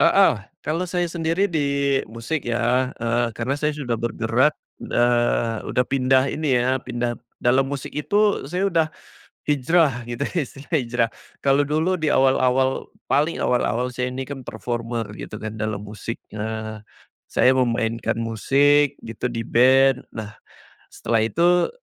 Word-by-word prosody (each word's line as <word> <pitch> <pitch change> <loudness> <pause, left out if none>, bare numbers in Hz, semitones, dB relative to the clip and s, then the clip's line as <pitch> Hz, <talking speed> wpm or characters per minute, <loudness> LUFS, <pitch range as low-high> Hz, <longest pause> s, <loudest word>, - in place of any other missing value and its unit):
Heeh, 195 0 +6 0.3
kalau 165 +5 -1
saya 175 0 0
sendiri 165 +3 0
di 140 -3 +1
musik 115 +7 -3
ya, 120 +2 +1
eee, 120 +1 +1
karena 125 +4 -1
saya 150 +1 +1
sudah 130 -5 -2
bergerak, 120 0 +1 0.3
eee, 120 -1 +1
udah 125 - +1
pindah 130 -1 +3
ini 145 -5 +1
ya, 130 +2 +1
pindah 120 -1 -2 0.3
dalam 130 +2 +3
musik 140 -2 -5
itu, 205 +7 +2
saya 185 +3 0
udah 165 -2 +2 0.6
hijrah, 145 -2 +2
gitu 120 -1 -3
istilahnya 145 +1 -3
hijrah. 115 -1 0 0.3
Kalau 140 +1 +3
dulu 160 +6 +1
di 155 -2 +1
awal-awal, 130 0 +2 0.2
paling 150 +4 +2
awal-awal 125 0 +1
saya 125 +1 -2
ini 130 +1 -4
kan 140 -2 -7
performer 115 0 -4
gitu - - -7
kan, 110 0 -5
dalam 105 -1 -3
musik. 110 +2 -6 0.2
Nah, 110 0 -5 0.5
saya 130 - +4
memainkan 115 -3 0
musik, 140 +5 +2
gitu 115 +2 -4
di 115 - -3
band. 130 +2 +4
Nah, 110 -1 -6 0.6
setelah 115 -1 0
itu, 175 +9 +3
130 Hz, 140 wpm, -23 LUFS, 115-145 Hz, 0.6 s, Heeh